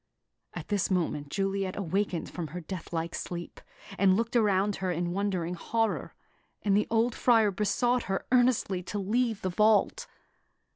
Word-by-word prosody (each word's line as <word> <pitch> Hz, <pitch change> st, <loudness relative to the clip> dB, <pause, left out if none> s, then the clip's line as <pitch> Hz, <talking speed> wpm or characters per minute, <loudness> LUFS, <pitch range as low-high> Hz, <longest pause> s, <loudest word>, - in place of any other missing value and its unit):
At -, -, -7 dB
this 205 Hz, -3 st, +1 dB
moment, 160 Hz, -6 st, -1 dB
Juliet 195 Hz, +1 st, -1 dB
awakened 195 Hz, -1 st, -1 dB
from 170 Hz, -3 st, -4 dB
her 170 Hz, +5 st, -6 dB
death 180 Hz, +1 st, -7 dB
like 165 Hz, 0 st, -2 dB
sleep, 175 Hz, -1 st, -6 dB, 0.4 s
and 190 Hz, -1 st, +5 dB
looked 230 Hz, +2 st, -2 dB
around 205 Hz, -3 st, +2 dB
her 185 Hz, -, -2 dB
in 175 Hz, 0 st, -1 dB
wondering 185 Hz, -3 st, -1 dB
horror; 225 Hz, +5 st, -1 dB, 0.5 s
and 200 Hz, -2 st, +3 dB
the 210 Hz, -, +2 dB
old 230 Hz, +1 st, +2 dB
Friar 225 Hz, -4 st, +4 dB
besought 240 Hz, +5 st, +1 dB
her 195 Hz, -, -1 dB
earnestly 245 Hz, -7 st, +3 dB
to 180 Hz, +3 st, -5 dB
leave 220 Hz, +2 st, 0 dB
the 185 Hz, -, 0 dB
vault. 215 Hz, -, +3 dB
195 Hz, 155 wpm, -29 LUFS, 180-220 Hz, 0.5 s, and